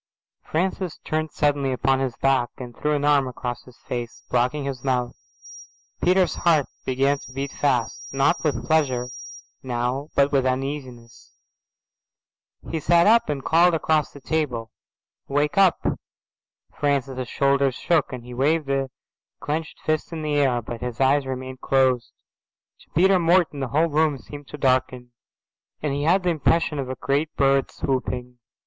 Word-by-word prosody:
Francis 180 0 -2
turned 155 0 -2
suddenly 145 -3 +1
upon 135 +1 +1
his 130 -3 -2
back 135 -3 +2
and 120 -2 -8
threw 150 0 0
an 145 0 -1
arm 145 -2 +4
across 120 -1 -5
his 125 -2 -16
face, 120 -2 -6
blocking 125 +4 +1
his 135 -3 -5
mouth. 125 -2 0 0.9
Peter's 185 0 +3
heart 160 -5 +3 0.2
began 135 +2 +1
to - - -12
beat 135 +1 -4
fast, 125 -5 0
not 135 +5 +1
with 140 -8 -1
pleasure 130 -6 +1 0.5
now 125 +3 -2
but 140 0 +3
with 135 -2 +3
uneasiness. 130 -2 -4 1.3
He 160 - -2
sat 170 +3 +4
up 230 -2 +4
and 140 -3 -3
called 170 +1 +4
across 155 -2 +1
the 140 - -12
table, 130 -7 -2 0.6
"Wake 145 +1 0
up." 195 -3 +5 1.0
Francis's 135 -3 -1
shoulders 140 -1 +2
shook 165 0 +1
and 125 -2 -6
he 125 +1 -10
waved 145 +3 +1
a 135 -1 0 0.5
clenched 155 +1 -4
fist 155 +1 -1
in 160 -2 -5
the 150 -1 -1
air, 130 -5 +2
but 115 +1 -7
his 125 -1 -5
eyes 135 +1 +3
remained 130 0 -6
closed. 130 -3 +2 0.7
To - - -22
Peter 190 +3 +5
Morton 170 -3 +3
the 135 - -2
whole 155 +6 +2
room 150 -1 +2
seemed 145 +1 -11
to 150 - -8
darken, 130 -2 0 0.7
and 145 -2 0
he 145 +1 -1
had 180 +4 +3
the 180 - +2
impression 160 -1 +1
of 130 -2 -3
a 130 - -3
great 140 +5 -1
bird 135 -1 +2
swooping. 125 -2 -3
140 Hz, 155 wpm, -24 LUFS, 130-155 Hz, 1.3 s, up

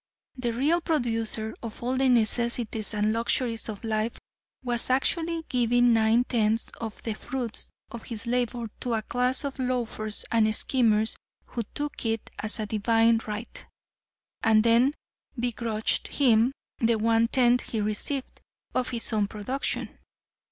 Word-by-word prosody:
The 250 -2 -2
real 295 +9 +1
producer 225 -8 -1
of 230 0 -7
all 250 +2 0
the 265 0 +3
necessities 235 -2 +2
and 210 +1 +1
luxuries 230 0 0
of 210 0 -6
life 220 0 -1 0.5
was 240 -1 -1
actually 325 +5 +1
giving 245 -1 +3
nine 225 +2 +4
tenths 225 -2 0
of 225 -2 -6
the 225 - -2
fruits 245 +1 -5 0.2
of 235 -1 -8
his 230 -1 -6
labor 240 -1 -1
to 245 -3 -1
a 220 - -2
class 250 +4 +1
of 280 -1 -5
loafers 240 -4 -2
and 215 -1 +3
schemers 220 -4 +2 0.3
who 235 - -4
took 295 0 -4
it 225 -1 -2
as 215 +1 0
a 215 - -1
divine 225 +2 +3
right, 210 +2 -6 0.8
and 220 -1 +4
then 235 +5 +4 0.4
begrudged 230 -2 0
him 240 -3 +3 0.3
the 230 0 +3
one 225 +1 +3
tenth 245 0 +3
he 225 - -4
received 215 +6 -3 0.3
of 255 -1 0
his 235 -1 -2
own 210 -2 +2
production. 215 +7 -3
230 Hz, 145 wpm, -27 LUFS, 220-250 Hz, 0.8 s, nine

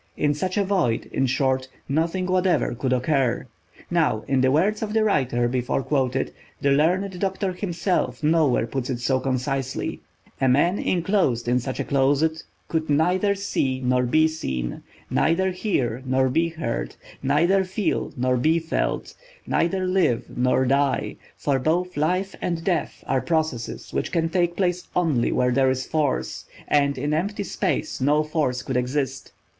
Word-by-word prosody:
In 145 0 +2
such 185 +6 -2
a 205 - +3
void, 185 - 0
in 135 - +1
short, 130 0 +1 0.2
nothing 165 +6 0
whatever 185 -4 +1
could 130 +2 -2
occur. 130 -1 +1 0.5
Now, 155 -11 +1
in 135 -1 +2
the 130 - +4
words 195 +9 +2
of 215 -1 -3
the 220 -1 +3
writer 125 - +1
before 125 +2 -1
quoted—the 135 0 -1
learned 180 +6 +1
doctor 195 0 -1
himself 175 - -1
nowhere 150 -7 +3
puts 130 +2 -4
it 130 - -1
so 130 +2 +1
concisely: 130 0 -2 0.4
"A 130 - +4
man 170 +9 +3
inclosed 175 - +1
in 125 +1 +3
such 130 +1 -5
a - - +1
closet 145 +4 +1 0.3
could 160 -1 -2
neither 180 +7 +2
see 135 -9 -1
nor 125 0 +2
be 155 +6 +3
seen; 65 - -4 0.3
neither 185 +4 +2
hear 135 - -1
nor 130 0 +2
be 165 +6 +1
heard; 150 - -4 0.3
neither 170 +8 +3
feel 190 +2 -2
nor 125 0 +1
be 155 +7 +3
felt; 165 -1 -2 0.3
neither 185 +2 0
live 185 -10 +1
nor 130 +1 +2
die, 140 +1 +1 0.2
for 140 -2 0
both 175 +6 0
life 180 +6 0
and 170 -2 -2
death 170 -5 -1
are 130 0 +1
processes 155 -4 -2
which - - -2
can 165 -2 +1
take 175 0 +1
place 180 -2 0
only 155 -9 +2
where 125 0 +2
there 130 +1 +3
is 130 0 -1
force, 155 -4 -1 0.2
and 140 -2 +2
in 145 +3 -1
empty 200 +6 -1
space 190 -7 -2
no 150 +3 +3
force 150 -5 -1
could 135 - -4
exist." 130 +1 -2
150 Hz, 160 wpm, -24 LUFS, 130-175 Hz, 0.5 s, the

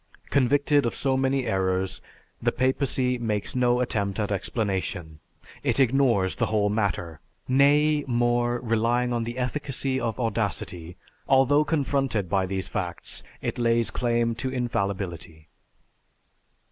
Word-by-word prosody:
Convicted 140 +1 +3
of - - -3
so 135 -2 +1
many 135 0 +1
errors, 95 -3 -1 0.4
the - - +2
papacy 130 -1 0
makes 105 -2 -2
no 125 0 +2
attempt 100 -5 -1
at 105 -1 -1
explanation. 95 -6 -2 0.4
It - - 0
ignores 120 -7 +3
the 115 - -1
whole 105 -2 +1
matter. 95 -7 -2 0.3
Nay, 145 +3 +4
more, 120 0 +1
relying 120 +1 +1
on 115 -1 -1
the 120 +2 -5
efficacy 130 0 -2
of 115 -3 -3
audacity, 100 -7 -3 0.3
although 135 +2 +4
confronted 135 - 0
by 95 -1 +1
these 95 0 -3
facts, 90 -4 -4 0.2
it - - -3
lays 115 -1 +2
claim 120 -1 0
to 130 +3 -3
infallibility." 100 -10 -3
120 Hz, 125 wpm, -26 LUFS, 100-130 Hz, 0.4 s, Nay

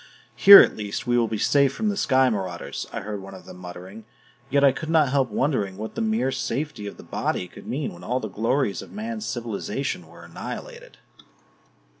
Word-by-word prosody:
"Here 200 0 +11
at - - +2
least 105 -1 -5
we 120 - +1
will 120 -1 +3
be 110 - -3
safe 140 +5 +3
from 215 +6 -1
the 205 - -1
sky 130 -8 +3
marauders," 95 -5 -4
I - - -4
heard 105 0 -5
one 95 0 -10
of 90 -2 -13
them - - -11
muttering. 90 +4 -10 0.4
Yet 140 +1 +2
I 140 - +7
could 155 +4 -6
not 155 -4 +4
help 135 -3 +2
wondering 105 -6 -1
what 110 +1 -6
the - - -4
mere 220 -11 0
safety 130 -3 -3
of 100 - -8
the - - -12
body 90 - -2
could - - -14
mean 140 +2 -3
when 85 0 -13
all 125 +7 -1
the 110 - -5
glories 115 +2 -1
of - - -12
man's 220 +1 -5
civilization 115 - -4
were 85 +1 -15
annihilated. - - -8
120 Hz, 205 wpm, -24 LUFS, 100-140 Hz, 0.4 s, Here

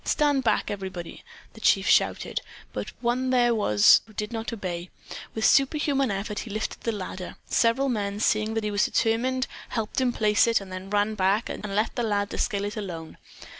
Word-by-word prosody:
Stand 290 -3 +2
back, 230 - +1
everybody," 190 -4 -6 0.3
the - - -14
chief - - +3
shouted; - - +2 0.3
but 105 - -4
one 250 +2 0
there 245 -2 +4
was 105 - +5
who 215 - -17
did 210 +2 -4
not 225 0 -3
obey. 180 -5 -5 0.5
With 220 - 0
superhuman 275 -1 +3
effort 205 +1 -3
he 230 - -6
lifted 215 +1 -4
the 230 - -1
ladder. 185 -3 -6
Several 235 +4 +2
men 205 -5 -2
seeing 215 0 +1
that 225 - -1
he 210 - -1
was 205 0 +2
determined 255 +3 +1 0.2
helped 225 +2 -2
him 255 -1 +2
place 215 -1 +3
it, 230 -1 +3
then 190 -1 -5
ran 205 +1 +1
back, 200 +2 +1
and - - -6
left 215 +5 0
the - - +1
lad 205 -3 0
to - - -4
scale 200 -3 0
it 205 +1 -5
alone. 170 -6 -6
215 Hz, 190 wpm, -26 LUFS, 200-240 Hz, 0.5 s, was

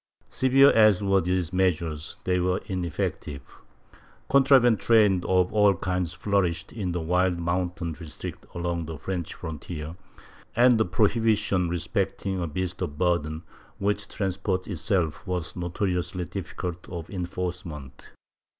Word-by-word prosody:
^ - - -22
Severe 135 +2 +6
as 110 -3 +5
were 100 -1 +3
these 90 -1 -1
measures, 85 -4 0
they 90 -1 +1
were 90 +1 +1
ineffective. 85 -6 -3 0.9
Contraband 135 -4 +5
trade 105 -6 +4
of 90 0 +2
all 105 -2 +5
kinds 90 -1 -2
flourished 90 -2 -1
in 100 -6 -3
the 90 - -2
wild 90 +2 +1
mountain 85 0 -2
districts 75 0 -8
along 85 -2 -2
the 80 -1 -6
French 90 +1 -4
frontier, 80 0 -6 0.6
and 120 -1 +5
the 110 - +3
prohibition 105 -2 +2
respecting 90 +2 -2
a 85 - -1
beast 90 +3 -3
of 75 - -3
burden, 80 -2 0 0.3
which 100 0 -1
transported 95 -1 -2
itself, 85 -3 -1
was 90 -3 -3
notori 90 +2 -2
ously 90 0 -4
difficult 90 -1 -6
of 85 -3 -6
enforcement. 85 -7 -5
90 Hz, 130 wpm, -26 LUFS, 85-100 Hz, 0.9 s, Severe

